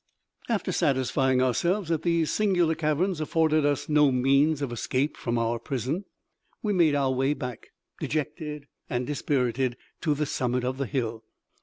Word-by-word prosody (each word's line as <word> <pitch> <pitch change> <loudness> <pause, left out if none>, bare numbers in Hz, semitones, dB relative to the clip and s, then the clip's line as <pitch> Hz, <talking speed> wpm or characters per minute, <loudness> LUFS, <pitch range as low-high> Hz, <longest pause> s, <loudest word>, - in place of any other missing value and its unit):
After 210 -5 0
satisfying 130 -3 +2
ourselves 170 - +1
that 165 -2 +1
these 170 -2 +1
singular 180 -6 +2
caverns 155 +3 0
afforded 155 -1 +2
us 145 -2 -1
no 150 -2 +4
means 140 +4 +3
of 135 - -3
escape 130 +4 -1
from 120 -1 -2
our 115 0 0
prison, 135 - -3 0.6
we 210 -2 +1
made 165 -6 +4
our 135 -2 +2
way 135 +3 +1
back, 125 -5 -6 0.3
dejected 150 -1 -3 0.2
and 125 -2 -1
dispirited, 130 -3 0 0.2
to 155 -2 +1
the 150 +1 0
summit 125 -2 -1
of 130 +1 -2
the 140 - -1
hill. 115 -4 -2
145 Hz, 155 wpm, -27 LUFS, 130-155 Hz, 0.6 s, no